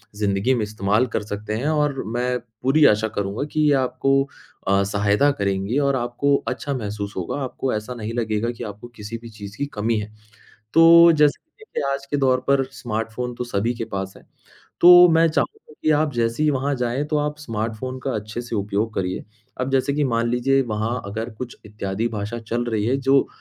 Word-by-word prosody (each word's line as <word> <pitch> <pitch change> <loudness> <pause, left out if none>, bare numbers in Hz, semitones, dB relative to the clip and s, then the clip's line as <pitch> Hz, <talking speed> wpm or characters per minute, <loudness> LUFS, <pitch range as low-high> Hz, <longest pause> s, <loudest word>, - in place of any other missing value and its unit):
ज़िंदगी 105 +4 +1
में 120 -4 0
इस्तेमाल 105 +2 +1
कर - - +1
सकते 105 +1 -5
हैं। 120 +7 -2
और 150 -3 +1
मैं 125 +2 -1 0.2
पूरी 145 +4 +4
आशा 105 +1 +4
करूँगा 100 +5 -2
कि 155 - +1
ये 145 - +5
आपको 135 +1 +1 0.4
अ, 100 0 +3
सहायता 105 +7 +2
करेंगी 100 +1 -1
और 140 - +1
आपको 125 +3 +1
अच्छा 140 - -2
महसूस 105 -4 -4
होगा। 95 +10 -3
आपको 130 0 -3
ऐसा 110 +4 -4
नहीं 110 0 -5
लगेगा 115 -1 -1
कि 120 0 -8
आपको 105 +2 -8
किसी 105 +2 -6
भी 115 - -10
चीज़ 105 -1 -10
की 145 - -1
कमी 110 +2 0
है। 105 0 -6 0.6
तो 170 +1 +8
जैसे 150 -2 +2 0.2
देखिए 435 - -5
आज 140 0 -3
के 145 +1 -2
दौर 130 -2 +3
पर 140 -1 +3
स्मार्टफ़ोन 115 0 -4
तो 125 - -3
सभी 120 0 -1
के 115 -1 -5
पास 95 -1 -5
है, - - -18 0.6
तो 175 0 +10
मैं 165 0 +5
चाहूँगा 155 -1 -3
कि - - +2
आप 150 -1 +1
जैसे 115 +4 0
ही 150 - +4
वहाँ 140 +1 0
जाएँ 125 +2 -1
तो 150 0 -1
आप 150 0 -1
स्मार्टफ़ोन 115 -1 -4
का 135 - -1
अच्छे 110 +3 -5
से 120 -1 -5
उपयोग 105 +2 -1
करिए। 95 -1 -2 0.4
अब 130 - -1
जैसे 135 +1 +1
कि 150 - +1
मान 115 -3 +1
लीजिए 135 +3 +2
वहाँ 110 +3 -2
अगर 110 +4 -4
कुछ 125 -1 -6
इत्यादि 105 +1 -3
भाषा 110 +1 -4
चल 115 +1 -2
रही 110 -3 -1
है, 130 +3 +2
जो 135 0 +3
120 Hz, 200 wpm, -22 LUFS, 105-135 Hz, 0.6 s, तो